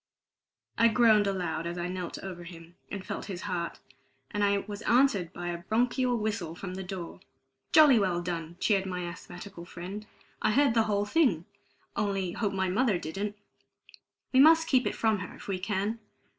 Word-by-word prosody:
I 230 - +7
groaned 220 -3 +5
aloud 170 -4 -2
as 170 +1 -4
I 175 0 -2
knelt 180 -1 -4
over 180 -2 -6
him 170 0 -12
and 195 -2 -6
felt - - -5
his 185 -3 -6
heart. 180 -4 -3 0.5
And 205 0 0
I 200 0 +3
was 205 -1 -7
answered 235 - +3
by 175 0 -5
a 170 0 -3
bronchial 245 +6 +1
whistle 205 -7 -2
from 180 +1 -6
the 190 - -5
door. 180 -2 -6 0.5
"Jolly 295 -7 +7
well 185 -4 +1
done!" 170 -1 -4
cheered 195 -3 +2
my 180 -1 -3
asthmatical 175 +1 -9
friend. 185 +4 -8 0.3
"I 215 - +2
heard 280 -2 +4
the 230 - +4
whole 205 0 +1
thing 205 - +2 0.5
only 195 -3 -1
hope 205 +1 -1
my 190 -1 0
mother 210 +1 +2
didn't. 200 +5 -4 1.0
We 260 - +5
must 325 +3 +7
keep 255 -4 +3
it - - -2
from 220 -2 +2
her 180 - -7
if - - -12
we 190 -2 -2
can." 205 +3 -1
195 Hz, 180 wpm, -29 LUFS, 175-220 Hz, 1.0 s, I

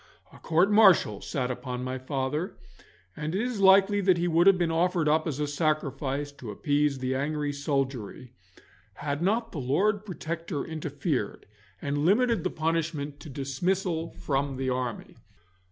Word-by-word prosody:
A - - -14
court 175 +5 +2
martial 190 - +5
sat 125 -2 -2
upon 125 0 -5
my 130 0 -3
father, 135 +5 -3 0.6
and 155 +3 -3
it 200 - +1
is 245 -4 -3
likely 195 +1 +5
that 185 -2 +4
he 175 +1 0
would 170 +2 +3
have 195 -1 +7
been 175 -2 0
offered 170 -1 +1
up 155 +2 +2
as 150 -3 -3
a 150 - +1
sacrifice 145 -2 -1
to 130 -5 -10
appease 145 +6 0
the 130 0 -2
angry 145 +2 -1
soldiery, 135 -4 -3 0.6
had 145 +1 -3
not 225 +5 0
the 155 - -5
Lord 195 +11 +1
Protector 170 -4 -4
interfered, 155 - -3 0.4
and 145 +1 -1
limited 210 +4 +3
the - - 0
punishment 155 -3 -2
to 155 - -10
dismissal 165 +5 -1
from 140 -1 -2
the 130 0 -1
army. 125 -2 -4
150 Hz, 155 wpm, -27 LUFS, 135-175 Hz, 0.6 s, have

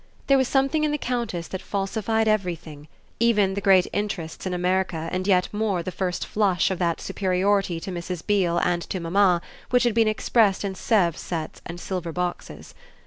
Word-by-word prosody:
There 275 - +4
was 260 - +2
something 275 +4 +1
in 305 - +2
the 295 - 0
Countess 235 - -3
that 190 - -5
falsified 220 +2 -1
everything, 170 -8 -2 0.3
even 210 -4 +3
the 200 - -3
great 190 -2 +5
interests 195 -5 -3
in - - -2
America 180 -2 0
and 185 +1 -2
yet 180 -2 +3
more 205 -4 -1
the 185 - -4
first 180 -1 -2
flush 195 -4 +1
of 185 - -3
that 170 -2 0
superiority 190 -2 0
to 190 - -5
Mrs. 175 -1 -5
Beale 185 -5 +2
and 175 -1 +1
to 190 - -2
mamma 180 +1 +2 0.3
which 250 0 +3
had 240 -2 +2
been 225 0 +3
expressed 215 -2 +2
in 195 - -2
Sèvres 185 -5 +1
sets 160 -3 -5
and 170 +1 -7
silver 180 -2 -4
boxes. 180 +1 -5
190 Hz, 185 wpm, -24 LUFS, 175-215 Hz, 0.3 s, great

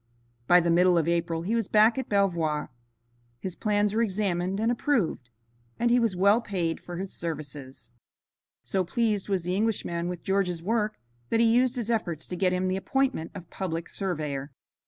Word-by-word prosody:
By 180 0 +7
the 170 0 +1
middle 180 +1 +4
of 165 -1 +1
April 170 -1 0
he 205 +6 -1
was 230 -4 0
back 215 +2 +5
at 265 -2 -4
Belvoir. 170 -8 0 0.7
His 185 +3 -5
plans 210 -1 +1
were 225 - +2
examined 190 -3 0
and 225 +2 +2
approved, 230 - 0 0.5
and 235 0 +1
he 245 - +5
was 230 -5 +1
well 200 +5 +4
paid 175 -7 -2
for 175 -1 -8
his 190 +1 -5
services. 140 -7 -6 0.7
So 190 -1 0
pleased 210 +2 0
was 190 -3 0
the 180 +2 -1
Englishman 195 -5 -1
with 180 -1 -5
George's 180 -4 0
work 215 +1 0 0.3
that 225 - +2
he 230 0 +4
used 250 +1 +3
his 235 -2 -2
efforts 170 -9 -2
to 180 - -3
get 185 0 +2
him 185 +1 0
the 185 +1 0
appointment 260 -2 0
of 180 -4 -10
Public 170 -3 -4
Surveyor. 150 -7 -3
185 Hz, 180 wpm, -27 LUFS, 170-215 Hz, 0.7 s, By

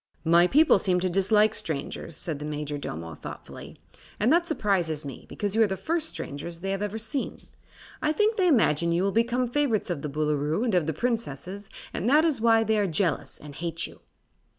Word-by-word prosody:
"My 170 +2 +5
people 300 - +5
seem 185 -2 +2
to 185 -1 0
dislike 210 +3 +3
strangers," 160 -1 -3
said 155 -4 -2
the 150 - -5
Majordomo, 145 - -5
thoughtfully, - - -10 0.4
"and 230 +7 +4
that 340 0 +3
surprises 180 - 0
me 135 -3 -8
because 205 -2 -3
you 225 - +3
are 220 - +5
the 190 -1 -3
first 320 - -1
strangers 165 +4 -6
they 195 +1 -2
have 195 0 -2
ever 210 +1 -2
seen. 245 +5 -3 0.6
I 305 - +2
think 425 +7 +2
they 380 -4 +2
imagine 170 - +3
you 175 +2 +1
will 200 - +1
become 235 +3 +1
favorites 240 -7 0
of 160 -5 -3
the 150 - -4
Boolooroo 150 +5 0
and 230 - 0
of 175 -4 +2
the 160 - 0
Princesses, 200 - -3 0.2
and 230 - -1
that 305 +4 +5
is 290 -8 0
why 225 -1 +5
they 220 0 +1
are 205 - +2
jealous 170 -2 -1
and 150 -1 -11
hate 165 +2 -3
you." - - -12
195 Hz, 200 wpm, -26 LUFS, 160-230 Hz, 0.6 s, My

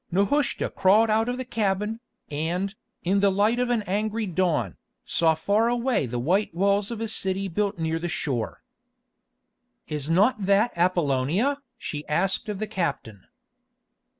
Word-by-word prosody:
Nehushta 240 +9 +1
crawled 215 +4 +4
out 220 +2 +2
of 250 - -2
the 260 - -4
cabin, 210 -1 -1 0.3
and, 175 +7 -2 0.3
in 195 +3 +2
the 200 0 +4
light 210 +5 +2
of 250 0 0
an 235 -3 +1
angry 215 +3 -1
dawn, 165 - 0 0.3
saw 165 -1 +3
far 205 +8 +1
away 240 - 0
the 120 +1 -4
white 170 - 0
walls 200 +2 +2
of 230 -2 -5
a 225 - -1
city 195 -2 0
built 200 +2 -1
near 160 0 -1
the 175 +1 -3
shore. 130 -9 -3 1.2
"Is 150 -1 -4
not 200 +4 +3
that 200 +4 +4
Appolonia?" 175 - +1 0.2
she 150 -9 -5
asked 190 +7 0
of 210 - -3
the 215 - -2
captain. 170 - -4
195 Hz, 150 wpm, -25 LUFS, 165-220 Hz, 1.2 s, crawled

